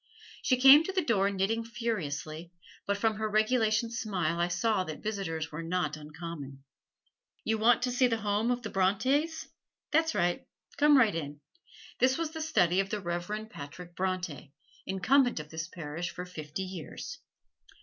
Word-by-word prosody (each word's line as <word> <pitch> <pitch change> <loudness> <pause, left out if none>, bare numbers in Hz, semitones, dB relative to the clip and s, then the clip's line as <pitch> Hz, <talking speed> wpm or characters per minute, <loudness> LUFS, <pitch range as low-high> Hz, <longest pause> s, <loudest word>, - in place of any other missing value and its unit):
She 255 - +2
came 270 +4 +9
to 385 - -2
the 375 -4 0
door 200 -6 +3
knitting 200 +4 0
furiously, 175 -8 -4 0.4
but 200 0 +1
from 220 +1 +1
her 215 0 -1
regulation 220 +1 +2
smile 205 -7 -1
I 175 - +2
saw 185 +3 +1
that 155 -4 -7
visitors 180 -7 -3
were 155 +2 -5
not 165 -2 -1
uncommon. 150 -3 -8 0.8
"You 220 0 0
want 235 +2 +4
to 250 - +1
see 250 +1 +3
the 230 -2 0
home 210 +2 +1
of 245 -1 -1
the 215 - -5
Brontes? 275 - +1 0.4
That's 320 +1 +2
right, 175 0 0 0.3
come 295 -1 +6
right 225 -7 +5
in. 145 -3 -5 0.6
This 260 +1 +3
was 330 -2 -2
the 320 0 -5
study 185 - +2
of 195 0 0
the 210 - -2
Reverend 190 +5 -4
Patrick 170 +5 -9
Bronte, 180 -7 -3 0.4
Incumbent 245 - +3
of 150 0 -9
this 160 +1 -4
Parish 170 -1 -5
for 180 - -6
fifty 155 0 -6
years." 185 -4 -7
195 Hz, 165 wpm, -30 LUFS, 170-235 Hz, 0.8 s, came